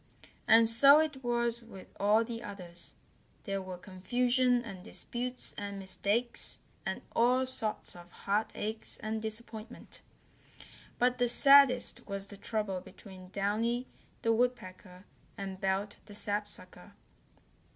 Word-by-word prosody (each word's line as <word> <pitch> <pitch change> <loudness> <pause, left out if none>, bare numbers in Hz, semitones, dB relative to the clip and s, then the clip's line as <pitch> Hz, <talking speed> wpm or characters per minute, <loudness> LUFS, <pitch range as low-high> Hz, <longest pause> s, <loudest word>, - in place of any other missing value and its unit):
And 225 +1 +6
so 275 +6 +9
it 300 -4 -2
was 235 -1 -1
with 210 -5 -12
all 210 +3 +3
the 230 0 -6
others. 185 -6 -8 0.5
There 195 -1 -3
were 185 -1 -7
confusion 245 +7 0
and 190 -5 -9
disputes 250 +5 0
and 200 -1 -6
mistakes, 200 +5 0 0.3
and - - -4
all 250 +3 +3
sorts 220 -7 -1
of 175 0 -13
heart 205 +4 -2
aches 220 +1 -2
and 220 0 -4
disappointment. 220 +1 -5 1.0
But 250 +1 +1
the 245 -1 +2
saddest 275 0 +5
was 200 -1 -5
the 200 0 -12
trouble 205 -3 -3
between 185 -1 -13
Downy 220 +5 -1 0.4
the 230 - +3
Woodpecker 205 -6 -3 0.3
and 195 -1 -6
Belt 195 +1 -1
the 205 - -11
Sapsucker. 205 -2 -3
215 Hz, 125 wpm, -31 LUFS, 195-240 Hz, 1.0 s, so